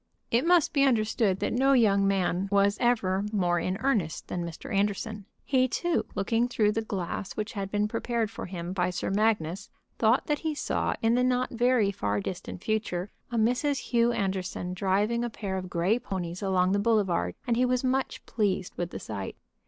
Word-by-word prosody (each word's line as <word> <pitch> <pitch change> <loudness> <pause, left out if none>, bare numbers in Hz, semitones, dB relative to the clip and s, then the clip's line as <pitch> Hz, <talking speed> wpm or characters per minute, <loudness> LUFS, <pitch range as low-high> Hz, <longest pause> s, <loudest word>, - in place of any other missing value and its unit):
It 240 +8 +2
must 350 -3 +4
be 280 - +4
understood 220 -6 +2
that - - 0
no 270 +3 +4
young 200 -6 +4
man 190 -1 0
was 200 0 +4
ever 200 -6 +2
more 175 -4 +1
in 185 +2 -2
earnest 220 - 0
than 175 - -2
Mr. 170 - -7
Anderson. 205 +1 -1 0.2
He, 260 -2 +3
too, 345 +6 -1
looking 225 +4 +1
through 215 -4 +2
the 225 - -1
glass 195 -2 -4
which 215 0 -4
had 195 -3 -4
been 210 +1 +1
prepared 230 0 -1
for - - -6
him 175 -1 -5
by 180 -1 +1
Sir 180 +1 -3
Magnus, 200 -3 0 0.3
thought 230 +3 +3
that 295 -1 0
he 315 -2 -2
saw - - -1
in 225 +1 +4
the 250 +1 +3
not 255 0 +1
very 240 -3 +2
far 105 - -1
distant 180 - -6
future 205 -4 -2 0.2
a 235 - -1
Mrs. 250 +5 +2
Hugh 235 -1 +4
Anderson 190 -3 -2
driving 205 +5 +1
a 240 - -1
pair 200 -4 -4
of 185 -1 -4
gray 185 +6 +1
ponies 185 -6 -5
along 185 -2 +2
the 200 - +2
boulevard 200 - +1
and 235 - +1
he 245 - +2
was 250 0 +1
much 260 +1 -1
pleased 195 -4 -1
with 175 -1 -2
the - - -6
sight. 100 -3 -6
210 Hz, 190 wpm, -28 LUFS, 185-240 Hz, 0.3 s, must